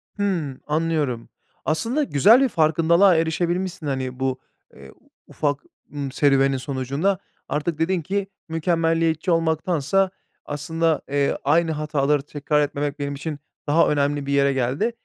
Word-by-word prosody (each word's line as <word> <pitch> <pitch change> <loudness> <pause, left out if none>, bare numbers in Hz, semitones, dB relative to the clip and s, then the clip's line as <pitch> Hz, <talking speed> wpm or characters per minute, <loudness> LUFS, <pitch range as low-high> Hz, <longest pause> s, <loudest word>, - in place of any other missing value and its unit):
Hımm. 175 -10 -2
Anlıyorum. 150 -6 -1 0.4
Aslında 230 - 0
güzel 220 - +5
bir 270 - +3
farkındalığa 170 +2 +4
erişebilmişsin, 170 +1 -1
hani, 130 -2 -3
bu, 130 -1 -1 0.4
eee, - - -13 0.4
ufak, 145 -2 -2 0.3
ımm, 140 -2 -4
serüvenin 135 -1 +3
sonucunda. 140 +8 -1 0.3
Artık 150 +2 -2
dedin 175 +2 +1
ki 195 +5 -2 0.2
mükemmeliyetçi 165 0 +1
olmaktansa 165 +2 +1 0.4
aslında, 160 +2 -1
eee, 140 0 +1
aynı 160 +4 +3
hataları 150 -2 0
tekrar 145 +1 -1
etmemek 145 0 -2
benim 140 0 -3
için 150 +1 -5 0.3
daha 155 +3 +4
önemli 145 -1 0
bir 140 - -2
yere 140 0 +3
geldi. 135 - 0
155 Hz, 130 wpm, -23 LUFS, 140-165 Hz, 0.4 s, güzel